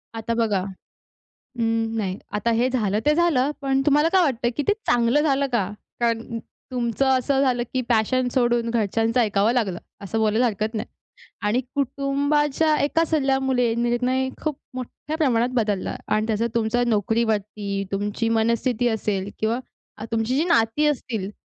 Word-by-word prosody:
आता 225 +1 -2
बघा 220 -5 +1 1.0
उम्म, 225 0 0
नाही. 190 -3 -2
आता 210 +3 0
हे 235 +3 +2
झालं 210 -5 0
ते 300 - +5
झालं, 305 -6 +2
पण 270 0 +1
तुम्हाला 295 +2 +4
काय 375 - +5
वाटतं 245 -6 +1
की 295 - 0
ते - - +6
चांगलं 240 +4 +3
झालं 280 -2 +2
का? 200 -6 +1 0.3
कारण 230 0 -1 0.3
तुमचं 245 +1 0
असं 265 +1 +2
झालं 245 -3 +2
की 260 - 0
पॅशन 245 +2 +2
सोडून 240 -2 +2
घरच्यांचं 225 +2 +1
ऐकावं 210 0 +2
लागलं 200 -8 0 0.3
असं 220 +4 -2
बोलायला 220 +3 +2
हरकत 215 +1 -2
नाही. 215 +2 -3 0.6
आणि 210 +4 +1
कुटुंबाच्या 285 +3 +1
एका 325 +3 +2
सल्ल्यामुळे 265 -6 +1
निर्णय 250 +2 0
खूप 305 -3 -1 0.2
मोठ्या 255 +4 -6
प्रमाणात 250 -6 +2
बदलला 210 -5 -1 0.2
आणि 215 +1 +1
त्या 225 +1 0
तुमच्या 230 +1 +1
नोकरीवरती, 210 -2 0
तुमची 205 +3 -1
मनस्थिती 230 +2 +1
असेल 205 -3 -2
किंवा 225 +3 0 0.4
अ, 215 - -7
तुमची 225 +3 0
जी 310 - +2
नाती 235 -1 +2
असतील, 225 -8 -2
235 Hz, 150 wpm, -23 LUFS, 220-265 Hz, 1.0 s, ते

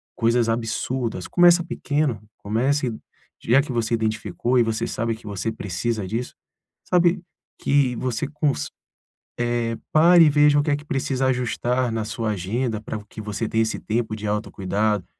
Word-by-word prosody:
coisas 115 0 +2
absurdas. 115 -2 -2
Começa 175 0 +5
pequeno, 145 - -1 0.2
comece 125 +4 0 0.5
já 125 +5 +4
que 145 -2 -6
você 115 -1 -1
identificou 110 +2 -1
e - - +5
você 115 0 -1
sabe 115 -1 -2
que 110 -1 -14
você 105 +2 -2
precisa 105 0 -3
disso, 115 +5 -3 0.5
sabe, 175 -1 +2 0.4
que 135 -3 +2
você 125 -2 -2
cons 145 - -1 0.9
eh, 115 0 -2 0.2
pare 170 +2 +7
e 150 - +5
veja 145 0 +5
o - - +4
que 150 - -1
é 145 - +3
que 145 - -10
precisa 135 -2 -1
ajustar 125 0 0
na 110 -1 -2
sua 110 0 -3
agenda 110 +4 -2
para 110 0 -5
vo 105 - -13
que 110 - -10
você 105 +2 -3
tenha 115 0 +2
esse 110 - -2
tempo 110 0 -2
de 105 0 -6
autocuidado. 105 -1 -1
115 Hz, 165 wpm, -23 LUFS, 110-135 Hz, 0.9 s, pare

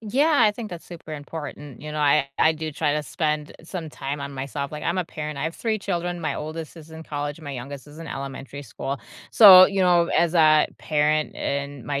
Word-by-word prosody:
Yeah, 280 +9 +2
I 210 - +5
think 215 0 -7
that's 175 -2 -8
super 165 -3 -10
important. 145 -2 -8
You 150 - -6
know, 150 - -4
I 145 -1 +3
I 160 - +5
do 160 0 -5
try 150 0 0
to 150 0 -1
spend 150 0 -2
some 165 -3 -6
time 140 +1 -5
on 140 0 -5
myself. 140 +1 -4
Like, 150 0 -7
I'm 170 - 0
a 185 - 0
parent. 150 -2 -6
I - - -3
have 160 +2 -3
3 225 -2 -1
children, 175 -3 -3
my 160 - -2
oldest 155 +1 -6
is 160 0 -13
in 160 0 -9
college, 145 0 -5
my 145 -3 -7
youngest 135 +2 -8
is 150 +2 -13
in 165 - -8
elementary 140 0 -7
school. 135 +1 -5 0.3
So, 190 -4 +10
you 195 -1 -1
know, 175 -1 +4
as 170 0 +2
a 155 -2 +5
parent 155 0 0
and 140 -2 -4
my 140 -1 -2
155 Hz, 225 wpm, -24 LUFS, 145-170 Hz, 0.3 s, So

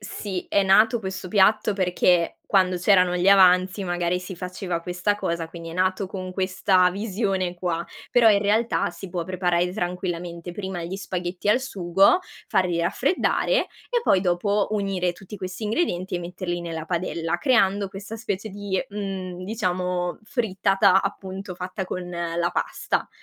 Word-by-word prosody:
sì, 200 -2 -5
è 200 - +3
nato 215 +4 +4
questo 190 -2 -5
piatto 210 +2 +3
perché 180 -2 +2
quando 185 -2 +3
c'erano 180 -1 +4
gli 180 +2 +2
avanzi 185 0 +5
magari 175 0 -1
si 185 +1 -7
faceva 180 -1 -4
questa 180 +4 -1
cosa, 170 -4 -2
quindi 165 0 -9
è - - -8
nato 185 +2 0
con 185 -1 -6
questa 185 -1 +2
visione 195 -2 -1
qua. 175 -2 -2 0.3
Però 235 -2 +6
in 205 - +5
realtà 215 +3 +1
si 195 -3 -10
può 175 -1 -2
preparare 180 -1 0
tranquillamente 175 -2 -4
prima 190 -2 -5
gli 175 +3 -4
spaghetti 180 0 -4
al 245 +5 +3
sugo, 195 - +3 0.3
farli 180 -2 +1
raffreddare 275 - +1 0.4
e 485 -1 +2
poi 195 - +4
dopo 200 +3 +1
unire 195 -4 0
tutti 195 +3 -11
questi 185 +3 -6
ingredienti 210 - -1
e 175 - -1
metterli 175 0 -4
nella 165 -1 -5
padella, 170 -1 -1
creando 200 -1 +2
questa 200 +3 -8
specie 210 -1 -4
di, 200 -1 -2
mhmm, 190 -3 -5
diciamo 180 -4 -2
frittata, 195 -4 +2
appunto, 190 0 -5
fatta 185 +2 -5
con 180 -1 -5
la 170 0 -2
pasta. - - -2
185 Hz, 150 wpm, -24 LUFS, 175-200 Hz, 0.4 s, Però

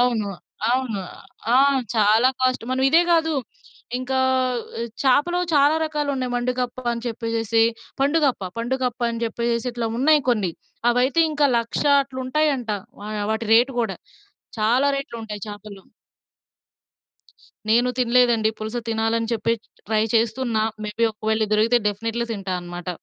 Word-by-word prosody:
అవును. 230 -5 +1 0.4
అవును. 250 -5 0 0.5
ఆ! - - +6 0.4
చాలా 220 +3 +5
కాస్ట్. 255 -2 +1
మనం 260 - 0
ఇదే 330 +4 +6
గాదు. 320 -1 +2 0.6
ఇంకా 260 +1 -2 0.8
చేపలో 290 +7 +3 0.2
చాలా 290 +2 +5
రకాలు 300 -2 -2
ఉన్నాయి. 255 -2 -3
మండుగప్ప 250 0 -2
అని 235 0 -5
చెప్పేసేసి. 230 -1 0 0.4
పండుగప్ప 280 -4 +2 0.2
పండుగప్ప 250 +1 -2
అని 230 - -5
జెప్పేసేసి. 235 +1 -1
ఇట్లా 235 -1 -2
ఉన్నాయి 300 +3 +4
కొన్ని. 210 -7 +1 0.4
అవైతే 250 +6 +2
ఇంకా 295 -1 +2
లక్ష 230 0 -2 0.2
అట్ల 265 -1 -10
ఉంటాయంట. 270 -3 0 0.3
వా 205 - -7 0.2
వాటి 220 +1 -3
రేట్ 245 +4 +4
గూడా, 205 -6 -2 0.6
చాలా 240 +6 +3
రేట్లు 275 -3 -5
ఉంటాయి 210 -2 -7
చాపలు. 205 -1 -10 1.9
నేను 240 +3 +3
తినలేదండి. 240 -2 +3
పులుస 220 +2 -4
తినాలని 225 0 0
చెప్పి, 230 0 0 0.3
ట్రై 220 -1 +2
చేస్తున్న. 230 +1 0 0.3
మే 210 - -4
బి 230 - +5
ఒకవేళ 220 +1 0
దొరికితే 225 +3 +3
డెఫినేట్లీ 225 +3 -3
తింటా 195 -3 -4
అనమాట. 175 0 -8
235 Hz, 130 wpm, -22 LUFS, 220-260 Hz, 1.9 s, ఆ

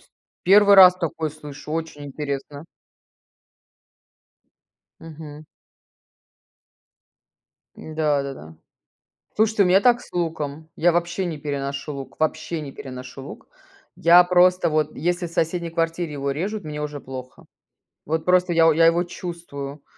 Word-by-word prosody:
Ст - - -27 0.3
1 200 +2 +6
раз 185 -2 +9
такое 160 -3 -3
слышу, 145 -1 -11
очень 160 -2 -5
интересно. 140 0 -6 2.4
Мгм. 155 -1 -11 2.3
Да, 155 -2 -1
да, 140 0 -5
да. 80 - -13 0.8
Слушайте, 220 -1 +3
у - - +2
меня 185 +2 +4
так 245 -1 +4
с - - -16
луком. 160 -3 -4
Я 175 +2 +3
вообще 175 +2 -1
не 165 -3 -4
переношу 140 0 -4
лук, 135 -1 -9
вообще 160 +1 -2
не 140 -2 -7
переношу 130 0 -9
лук. - - -11 0.5
Я 175 +2 +6
просто 180 0 +3
вот, 155 -1 -1
если 175 +3 -1
в - - -12
соседней 170 +1 -1
квартире 165 -1 -2
его 140 -1 -2
режут, 200 +8 -4
мне 150 -1 -6
уже 150 -1 -5
плохо. 130 -1 -10 0.6
Вот 160 +1 -2
просто 180 -1 +3
я 165 -1 +5
я 165 +2 +4
его 170 +1 +3
чувствую. 165 -5 -8
160 Hz, 130 wpm, -22 LUFS, 145-175 Hz, 2.4 s, раз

